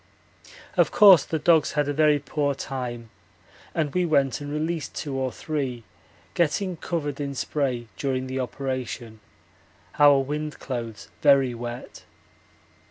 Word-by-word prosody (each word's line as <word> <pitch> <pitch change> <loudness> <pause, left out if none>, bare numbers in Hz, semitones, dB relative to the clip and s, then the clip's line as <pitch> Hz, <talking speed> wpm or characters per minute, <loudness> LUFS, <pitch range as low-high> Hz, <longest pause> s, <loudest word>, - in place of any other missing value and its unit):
Of - - +4
course 195 -6 +7
the 160 - -2
dogs 160 0 +3
had 150 -1 +1
a 145 - -1
very 150 0 +4
poor 145 0 -1
time, 120 -4 -5 0.6
and 155 -3 -1
we 180 - +2
went 140 -6 +1
and 145 0 -6
released 155 +1 -3
two 145 -3 -4
or 130 -1 -1
three, 135 -7 -4 0.5
getting 175 +3 0
covered 150 -4 -3
in 140 -1 -4
spray 130 -5 -1
during 130 -2 -1
the 130 0 -4
operation 125 -3 -4 0.8
our 145 -1 +7
wind 150 +3 -3
clothes 115 -6 -6
very 135 -4 +5
wet. 120 +1 -7
140 Hz, 135 wpm, -25 LUFS, 130-150 Hz, 0.8 s, course